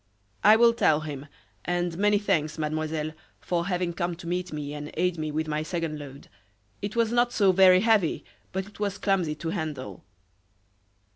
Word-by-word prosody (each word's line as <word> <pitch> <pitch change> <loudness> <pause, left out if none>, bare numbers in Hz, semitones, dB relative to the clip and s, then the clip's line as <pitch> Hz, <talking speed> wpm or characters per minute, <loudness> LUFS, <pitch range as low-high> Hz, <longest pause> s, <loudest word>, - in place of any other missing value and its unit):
"I 210 +1 +8
will 235 +1 +5
tell 155 -9 +3
him, 145 -2 -6 0.4
and 175 -1 -1
many 205 +3 +3
thanks, 155 -7 0
Mademoiselle, 155 0 -2 0.3
for 175 0 -2
having 180 -2 -1
come 175 0 -2
to 170 - -12
meet 180 +1 -2
me 150 -1 -5
and 150 0 -6
aid 180 0 0
me 155 -1 -2
with 155 +1 -2
my 150 0 -1
second 165 -2 -3
load. 140 -1 -10 0.5
It 205 +2 -4
was 230 -1 +2
not 240 0 +2
so 200 -5 +4
very 185 0 +6
heavy, 215 -6 +2 0.3
but 190 0 -3
it 210 - -16
was 200 -1 -2
clumsy 185 -7 0
to 160 +2 -5
handle." 140 - -5
170 Hz, 175 wpm, -26 LUFS, 155-195 Hz, 0.5 s, I